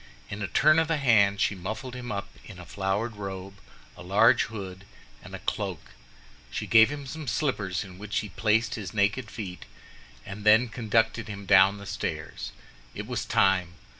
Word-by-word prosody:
In 105 - -5
a 105 - -1
turn 155 - +4
of 160 - +1
the 165 -1 +1
hand 105 -7 +4
she - - +2
muffled 110 +7 -6
him 125 -2 -6
up 100 -1 -4
in 100 - -11
a 90 - -10
flowered 100 +4 -2
robe, 95 -1 -7 0.4
a - - -12
large 105 +7 +4
hood, 95 -4 -8 0.4
and - - -9
a - - -11
cloak. - - -3 0.6
She - - -4
gave 110 -1 +6
him 145 -1 -6
some 155 +2 -7
slippers, 110 - -1
in 95 -1 -12
which 105 0 -4
he 105 - -8
placed 110 +4 +1
his 105 -2 -6
naked 100 +3 +1
feet, 95 -5 -7 0.6
and 100 0 -8
then 110 +3 +5
conducted 115 0 0
him 100 -1 -7
down 95 0 +6
the 100 - -10
stairs. 80 -6 -5 0.4
It - - -5
was - - -3
time. 90 -3 +2
105 Hz, 180 wpm, -27 LUFS, 95-115 Hz, 0.6 s, gave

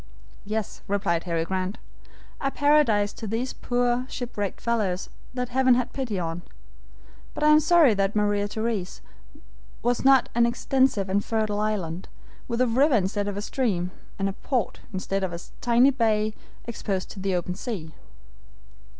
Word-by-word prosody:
"Yes," 215 +1 -3
replied 190 -4 0
Harry 165 -2 0
Grant, 190 +3 -2 0.6
"a 275 - 0
paradise 275 -9 +3
to 220 - -7
these 230 +5 -2
poor, 245 +1 0
shipwrecked 210 -6 -4
fellows 210 -6 -1 0.3
that 250 -1 -2
Heaven 255 0 +4
had 250 0 -1
pity 250 -7 -2
on, 165 -1 -3 0.9
but - - -3
I 300 - +6
am 305 0 +8
sorry 315 -5 +5
that 195 0 0
Maria 205 -1 +2
Theresa 220 -3 -3 0.8
was 240 +1 +1
not 270 -1 +6
an 235 0 +4
extensive 250 -4 +1
and 200 +2 +1
fertile 215 -2 -1
island, 190 -5 -2 0.4
with 235 +1 -1
a 255 - +4
river 265 +4 +4
instead 200 0 0
of 200 -1 -3
a 205 - -3
stream, 195 -9 -1 0.3
and 195 - 0
a 195 - -2
port 250 +2 -2
instead 195 0 -2
of 185 -2 -2
a 170 - -4 0.2
tiny 240 +3 +5
bay 220 -4 +1 0.3
exposed 200 -5 -3
to 200 - -9
the 190 -1 0
open 180 0 -2
sea." 180 -7 -5
215 Hz, 160 wpm, -26 LUFS, 195-245 Hz, 0.9 s, am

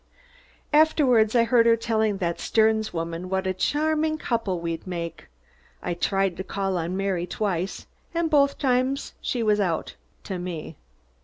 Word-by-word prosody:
Afterward 265 -8 +4
I 235 - +6
heard 235 -1 +4
her 230 - +6
telling 220 -3 0
that 170 -3 -2
Sterns 220 -1 +2
woman 165 +2 -4
what 190 0 -1
a 190 - 0
charming 310 - 0
couple 225 - -1
we'd 165 +1 -4
make. 170 -2 -5 0.6
I 175 - -1
tried 195 +1 0
to 190 - -4
call 195 -1 -2
on 170 +3 -3
Mary 190 -3 -1
twice 190 -1 -2 0.3
and 335 -1 0
both 280 -3 +3
times 260 0 0
she 240 -2 -1
was 210 -1 +3
out 175 -5 -1 0.3
to 190 -3 -4
me. 175 -3 -6
200 Hz, 155 wpm, -25 LUFS, 180-245 Hz, 0.6 s, I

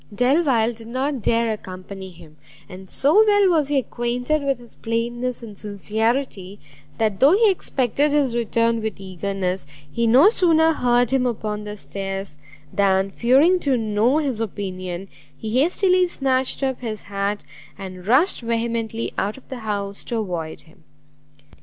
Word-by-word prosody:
Delvile 245 0 +2
did 225 0 -11
not 260 +2 -2
dare 230 +1 +1
accompany 190 -1 -8
him; 160 -3 -16 0.3
and 185 0 -11
so 315 +11 +4
well 410 -2 +4
was 310 -5 +2
he 290 0 +1
acquainted 245 +3 -1
with 275 -1 0
his 240 -1 -14
plainness 240 +2 -2
and 215 -3 -9
sincerity, 210 0 -2 0.4
that 215 -4 0
though 280 +5 +6
he 430 +1 +5
expected 285 - 0
his 285 -4 +2
return 230 0 +1
with 220 -2 -4
eagerness, 190 -2 -3 0.2
he 235 +5 0
no 265 - +7
sooner 325 -6 +3
heard 245 -4 +2
him 260 -2 +2
upon 210 -3 -3
the 210 0 -6
stairs, 195 -5 -6 0.3
than 195 -1 +2
fearing 275 - +4
to 275 -6 +1
know 220 +4 +2
his 270 -7 -1
opinion, 185 -3 -5 0.3
he 225 +4 0
hastily 365 +3 +3
snatched 265 -4 -1
up 265 -2 -1
his 220 -3 -4
hat, 200 +1 -3 0.3
and 185 -1 -9
rushed 270 - +3
vehemently 230 -1 -2
out 205 +4 -2
of 265 - -16
the 260 - -6
house 200 -2 -4
to 235 - -3
avoid 175 -7 -4
him. 160 +1 -22
230 Hz, 155 wpm, -22 LUFS, 200-265 Hz, 0.4 s, no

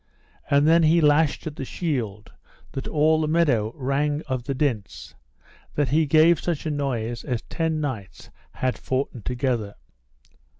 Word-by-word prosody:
And 140 +1 +4
then 165 +1 +6
he 165 +1 +4
lashed 150 -1 +3
at 155 -1 -6
the - - -4
shield, 120 - -3 0.4
that 135 - -5
all 155 +1 +3
the 155 - 0
meadow 145 -10 +2
rang 145 +3 -1
of 130 -2 -3
the 140 - -2
dints, 130 -8 -2 0.6
that 145 -3 +1
he 155 +3 +2
gave 155 +2 +5
such 170 -4 -3
a 155 - -1
noise 120 -5 -2
as 125 -5 -3
ten 160 -1 -2
knights 130 -10 -5 0.2
had 130 -1 -2
foughten 130 -2 -2
together. 120 -4 -2
145 Hz, 155 wpm, -24 LUFS, 125-155 Hz, 0.6 s, then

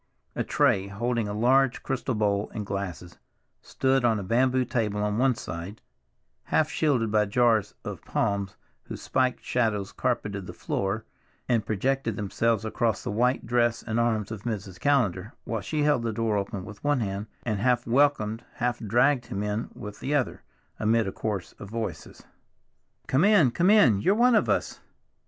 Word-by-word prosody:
A - - -1
tray, 95 0 +2
holding 115 +2 -1
a - - -4
large 125 +3 +3
crystal 130 -2 -2
bowl 105 -1 0
and 105 - -3
glasses, 95 -3 -5 0.4
stood 135 -1 0
on 115 -3 +2
a - - -5
bamboo 130 +5 +2
table 105 -4 -1
at 105 - -1
one 125 +3 +2
side, 95 +2 -7 0.7
half 155 0 +1
shielded 125 -8 +1
by 105 0 +3
jars 115 -1 +2
of - - -6
palms 100 -1 -2 0.3
whose - - -7
spiked 130 -1 0
shadows 110 -5 0
carpeted 100 -3 -2
the - - -7
floor 100 +3 -2 0.4
and 115 -3 +1
projected 115 +2 0
themselves 110 +1 0
across 110 0 -1
the - - -3
white 125 +5 +1
dress 120 0 +1
and 115 0 -1
arms 110 -3 0
of 110 -3 -6
Mrs. 100 -5 -5
Callender, 110 -8 +1
while 115 -2 -3
she 150 +9 -1
held 145 -4 +3
the 115 -1 -1
door 110 0 0
open 100 -1 -3
with 110 -1 -11
one 145 -3 +2
hand, 100 0 -3 0.2
and 110 -4 -1
half 120 +2 +2
welcomed, 120 -3 +2
half 120 0 -1
dragged 120 +4 +2
him 100 +1 -3
in 105 +2 -2
with 105 0 -8
the 145 +2 -1
other, 135 -4 -1 0.4
amid 110 +1 +2
a - - -2
chorus 100 -4 -4
of 100 - -9
voices, 110 -8 -6 0.8
"Come 135 +5 +2
in, 200 - +5
come 175 +9 +2
in, 130 - +5
you're 195 - +3
one 245 +2 +4
of 215 - +3
us." - - 0
115 Hz, 175 wpm, -26 LUFS, 105-125 Hz, 0.8 s, in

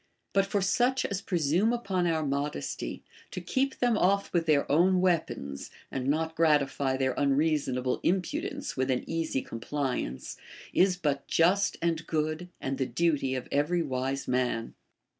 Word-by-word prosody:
But 195 0 +3
for 200 0 0
such 245 +7 +2
as 200 -1 -2
presume 175 +4 +1
upon 195 -7 0
our 160 -2 0
modesty, 140 +1 -3 0.3
to - - -5
keep 270 0 -1
them 240 -3 +2
off 200 +2 +2
with 170 -2 +1
their 150 -2 +4
own 180 +5 +4
weapons, 165 - -1 0.2
and 130 -1 -3
not 160 +3 0
gratify 140 -4 +2
their 130 -1 +1
unreason 140 -1 +2
able 125 0 -1
impudence 285 - -1
with 130 0 0
an 125 -1 0
easy 165 -5 -1
compliance, 125 - -3 0.4
is 185 -1 +4
but 145 -5 -1
just 190 +5 +3
and 165 -1 0
good, 155 +2 -1
and 135 0 -3
the 130 - 0
duty 135 -1 +1
of 130 - -4
every 160 +5 +1
wise 135 -1 -2
man. 125 -2 0
155 Hz, 155 wpm, -29 LUFS, 135-185 Hz, 0.4 s, their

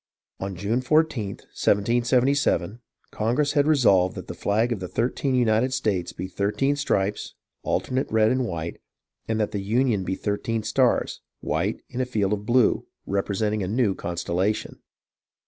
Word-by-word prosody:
On 95 0 -4
June 105 +7 -1
14th, 130 -8 +1
1777, 120 -1 +2 0.3
Congress 125 +7 0
had 145 0 +2
"resolved 100 -12 +4
that - - -7
the - - -6
flag 110 +4 0
of 115 - -1
the 90 - -5
thirteen 130 +6 -1
United 120 +1 +2
States 100 -9 -1
be 95 - -6
thirteen 105 +9 0
stripes, 105 -8 -1 0.3
alternate 130 +1 -1
red 110 0 +4
and 130 -1 0
white; 85 -2 -5 0.5
that 110 -1 0
the 100 - -3
Union 110 0 +1
be 95 +1 -2
thirteen 110 +3 -2
stars, 120 +3 +1 0.2
white - - -1
in 125 - -3
a 130 - -1
blue 105 +1 +2
field, - - -21 0.2
representing 105 +2 -1
a 95 - -2
new 110 0 +1
constellation." 90 +4 -2
110 Hz, 145 wpm, -25 LUFS, 100-125 Hz, 0.5 s, resolved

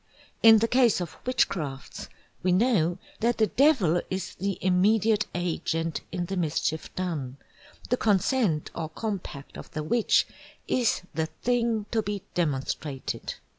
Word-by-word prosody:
In 225 -1 +9
the 225 +2 +2
case 240 -4 +4
of 175 -3 -5
Witchcrafts 150 - -1 0.3
we 185 - +1
know 180 -4 +3 0.2
that 235 +1 +1
the 220 - +4
Devil 205 - +3
is 190 0 -3
the 195 0 -2
immediate 210 +3 +3
Agent 165 -2 -1
in 175 -1 -2
the 195 - -4
Mischief 160 -2 -1
done, 150 -8 -3 0.5
the 250 - +3
consent 205 - +1
or 160 -2 -4
compact 180 -7 -5
of - - -10
the 155 - -3
Witch 225 +8 +3 0.4
is 240 -6 +1
the 160 0 -1 0.2
thing 235 -3 +1
to 225 - +2
be 205 -2 -4
Demonstrated. 140 -3 -2
185 Hz, 135 wpm, -27 LUFS, 160-225 Hz, 0.5 s, In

